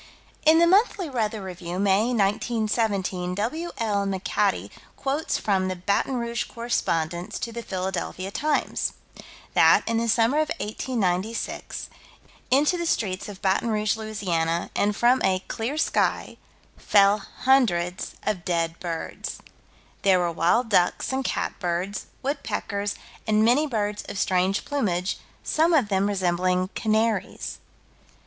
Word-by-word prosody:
In 315 +1 +8
the 340 - +6
Monthly 375 -3 +3
Weather 220 -4 -1
Review, 180 -1 -6
May, 200 +2 +3
1917, 210 -4 0
W.L. 225 - -1
McAtee 190 -1 0 0.3
quotes 280 +4 -1
from 190 -3 +1
the 185 - -2
Baton 200 +8 0
Rouge 235 -1 -2
correspondence 175 -7 -2
to 235 - -4
the 235 +1 -5
Philadelphia 190 -1 -3
Times: 300 +6 0 0.6
That, - - +6
in 230 0 +1
the 230 0 -1
summer 230 +6 +3
of 310 - +1
1896, 215 -2 -2 0.6
into 295 +7 +3
the 340 - -1
streets 195 -8 -1
of 200 0 -10
Baton 195 +4 +2
Rouge, 215 -1 +1
La., 175 -7 -1
and 205 0 +1
from 245 +4 +3
a 185 0 +2
"clear 240 +7 -3
sky," 315 - 0 0.4
fell 200 0 +4 0.2
hundreds 200 -9 +2
of 195 -5 -1
dead 165 -1 -1
birds. 170 -2 -5 0.6
There 195 -2 +5
were 175 -1 +1
wild 180 +9 +2
ducks 180 +5 +2
and 265 0 0
cat - - -2
birds, 180 +2 -2 0.2
woodpeckers, 205 -7 -2 0.3
and 215 0 +4
"many 270 +7 +4
birds 210 -5 -1
of - - -5
strange 185 +1 +1
plumage," 195 -10 -1 0.2
some 325 +2 +3
of 250 -9 +2
them 195 0 +2
resembling 185 -1 +1
canaries. 215 -2 -1
205 Hz, 130 wpm, -25 LUFS, 185-235 Hz, 0.6 s, In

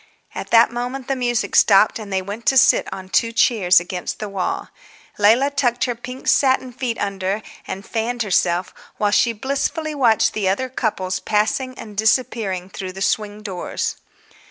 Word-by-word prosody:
At - - -6
that 230 0 +5
moment 245 +2 -4
the 270 - 0
music 240 -1 -1
stopped, 210 +2 +5
and 210 -2 -8
they 190 -1 0
went 205 +4 -7
to 265 - +4
sit - - +4
on 190 -1 -7
two 230 +4 +1
chairs 210 -6 +4
against 180 +1 -5
the 210 - -5
wall. 195 -2 -3 0.5
Leila 235 +7 +4
tucked 245 -4 0
her 245 - 0
pink 250 +2 -9
satin 260 -2 +2
feet 240 -2 -3
under 200 +1 -2 0.2
and 195 +1 -6
fanned 235 +1 -2
herself, 180 -3 0 0.2
while 210 -1 +1
she 235 +3 +3
blissfully 280 +7 -2
watched 240 -6 +3
the 200 -3 0
other 255 +7 -1
couples 185 -7 -2
passing 225 +5 -1
and 210 -2 -10
disappearing 215 -4 0
through 190 -1 -7
the 190 - -9
swing 210 0 -1
doors. 190 -4 -4
220 Hz, 170 wpm, -20 LUFS, 195-245 Hz, 0.5 s, that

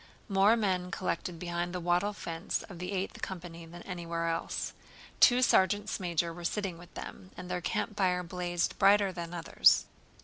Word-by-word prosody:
More 200 +2 +4
men 185 -4 0
collected 180 -2 -3
behind 175 +1 -3
the - - -1
wattle 175 +4 +1
fence 165 -2 -3
of 175 -4 -11
the 180 +2 -4
Eighth 195 0 -3
Company 170 -3 -6
than 175 +1 -11
anywhere 170 -2 -3
else. 165 - -2 0.5
Two 250 +1 +7
sergeants 205 -2 +3
major 170 -2 -1
were 175 +1 -9
sitting 185 -1 -2
with 175 - -14
them 185 - -8
and 180 - -7
their 180 0 -1
campfire 180 0 0
blazed 175 0 -2
brighter 200 0 +5
than 170 -1 -6
others. 175 -1 +4
180 Hz, 165 wpm, -31 LUFS, 170-195 Hz, 0.5 s, Two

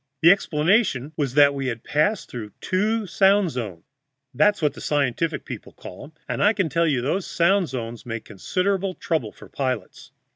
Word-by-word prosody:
The 170 - +9
explanation 160 - +1
was 140 -4 -2
that 145 -1 +6
we 135 -1 -3
had 115 -2 -4
passed 170 +8 0
through 110 -5 -8
two 215 +4 0
sound 195 -1 +3
zones 105 -10 -5 0.5
that's 205 +10 +3
what 150 -3 +1
the - - -11
scientific 145 +2 -1
people - - -8
call 90 - -10
'em 155 - -16
and - - -1
I 205 +2 +5
can 195 -6 0
tell 165 +4 +1
you 135 -5 +1
those 175 +8 -1
sound 180 0 +2
zones 120 -2 -6
make 115 -2 -6
considerable 190 - -1
trouble 155 -11 -2
for - - -15
pilots." 130 -8 -4
150 Hz, 180 wpm, -23 LUFS, 125-190 Hz, 0.5 s, The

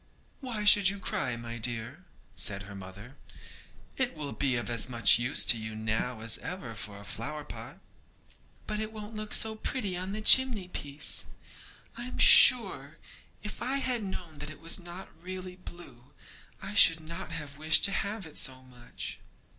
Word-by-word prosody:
'Why 235 -6 -5
should 205 -2 +7
you 200 - -4
cry, 125 -9 -2
my 115 0 -8
dear?' 120 +8 -3 0.3
said 100 -4 -1
her 100 0 -12
mother; 100 +7 -12 0.8
'it 260 -6 0
will 145 -2 -5
be 135 -3 -1
of 120 - -3
as 120 +1 -1
much 115 -1 +5
use 125 +3 +1
to 115 - +5
you 110 0 -7
now 110 +2 -3
as 115 0 -1
ever 160 -10 -6
for 105 -2 -7
a 100 - -12
flower 150 +8 -6
pot.' - - -10 0.9
'But 210 0 -4
it 215 0 -4
won't 215 0 -9
look 215 0 -6
so 220 0 +1
pretty 215 -3 -3
on 185 +2 -5
the 215 - -4
chimney 225 -5 +5
piece. 145 -3 -2 0.7
I 240 - -7
am 255 - -8
sure, 165 - +7 0.5
if 210 - -8
I 270 +2 -2
had 250 -4 -2
known 175 -6 -8
that 150 +1 -5
it 155 - -12
was 165 +4 -3
not 175 +1 -10
really 185 0 -8
blue, 175 -9 -12 0.5
I 195 +2 -8
should 165 -5 +7
not 170 +2 -8
have 150 -3 -8
wished 155 +1 +4
to 200 - +4
have 200 +1 -4
it 155 - -8
so 130 -1 -2
much.' 125 -2 -8
160 Hz, 180 wpm, -28 LUFS, 120-200 Hz, 0.9 s, should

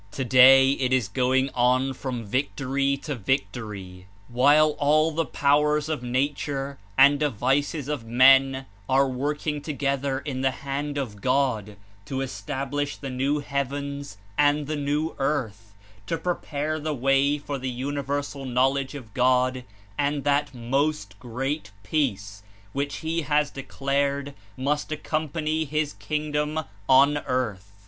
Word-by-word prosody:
Today 130 +1 +6
it 130 -2 -1
is 130 -5 +2
going 130 +5 +1
on 130 +2 +2
from 125 -3 -5
victory 135 +3 0
to 150 - -3
victory, 100 -6 -3 0.2
while 145 +5 +5
all 155 +2 +3
the 165 +1 -1
powers 150 +1 +2
of 155 -5 -2
nature 135 +2 -2 0.2
and 140 +2 +6
devices 140 +2 0
of 145 -5 -3
men 135 +3 +5 0.2
are 135 +1 +4
working 145 +3 -2
together 140 -2 -1
in 135 -1 -4
the 135 - +3 0.2
hand 145 +1 -3
of 110 -8 -4
God 125 -6 0 0.3
to 135 +3 -3
establish 140 +1 -3
the 135 -2 -6
new 140 +3 0
heavens 140 -3 -4 0.2
and 145 0 +3
the 155 +2 -3
new 150 +2 -1
earth, 115 -7 -2 0.3
to 165 - -1
prepare 155 -2 -2
the 155 0 -2
way 135 +3 +2
for 145 -1 -5
the 130 0 -3
universal 140 +2 -3
knowledge 135 +2 0
of 115 -7 -10
God 130 0 +2 0.4
and 145 0 0
that 145 -1 +1
"Most 125 -4 -2
Great 130 +2 -3
Peace" 100 -6 -2 0.3
which 140 +1 -2
He 165 +1 0
has 150 0 +1
declared 140 +1 -2 0.2
must 145 +4 -1
accompany 155 +1 -1
his 150 0 -2
King 150 0 -3
dom 150 +1 -1 0.2
on 140 +2 +5
earth. 105 -8 -3
140 Hz, 135 wpm, -25 LUFS, 130-145 Hz, 0.4 s, Today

